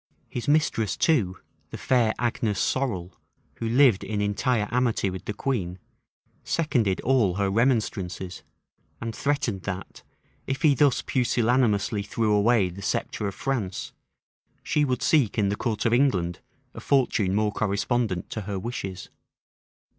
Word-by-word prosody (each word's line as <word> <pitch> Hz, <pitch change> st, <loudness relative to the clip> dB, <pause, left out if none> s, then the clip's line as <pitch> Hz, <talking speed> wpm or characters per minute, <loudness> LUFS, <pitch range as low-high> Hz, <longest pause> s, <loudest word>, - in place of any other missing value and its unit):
His 120 Hz, -, -5 dB
mistress 145 Hz, -8 st, +1 dB
too, 105 Hz, -, +2 dB, 0.3 s
the -, -, -7 dB
fair 120 Hz, -4 st, +2 dB
Agnes 115 Hz, -4 st, -1 dB
Sorel, 95 Hz, -10 st, -1 dB, 0.4 s
who 115 Hz, -, -3 dB
lived 125 Hz, -4 st, +4 dB
in 105 Hz, 0 st, -3 dB
entire 105 Hz, +2 st, 0 dB
amity 120 Hz, -5 st, +1 dB
with 95 Hz, -, -7 dB
the -, -, -2 dB
queen, 100 Hz, -9 st, -2 dB, 0.7 s
seconded 125 Hz, -, 0 dB
all 120 Hz, -9 st, +2 dB
her 100 Hz, -1 st, 0 dB
remonstrances, 100 Hz, -6 st, 0 dB, 0.6 s
and 115 Hz, -1 st, -5 dB
threatened 140 Hz, -9 st, -1 dB
that, 95 Hz, -1 st, -6 dB, 0.5 s
if 135 Hz, +4 st, -3 dB
he 150 Hz, -3 st, +6 dB
thus 140 Hz, 0 st, +3 dB
pusillanimously 120 Hz, -4 st, +1 dB
threw 105 Hz, +1 st, 0 dB
away 105 Hz, -2 st, +3 dB
the 90 Hz, +3 st, -9 dB
sceptre 100 Hz, +2 st, -2 dB
of 100 Hz, -, -5 dB
France, 115 Hz, -9 st, -3 dB, 0.7 s
she 150 Hz, -, +1 dB
would 130 Hz, -4 st, -1 dB
seek 140 Hz, -10 st, +3 dB
in 100 Hz, -2 st, +2 dB
the 100 Hz, -, 0 dB
court 110 Hz, 0 st, -2 dB
of 115 Hz, -, +3 dB
England 95 Hz, -10 st, +2 dB, 0.3 s
a -, -, -8 dB
fortune 110 Hz, -8 st, +1 dB
more 105 Hz, 0 st, +1 dB
correspondent 105 Hz, -1 st, -1 dB
to 110 Hz, -, -3 dB
her 100 Hz, -1 st, -4 dB
wishes. 95 Hz, -3 st, -5 dB
110 Hz, 140 wpm, -26 LUFS, 100-125 Hz, 0.7 s, he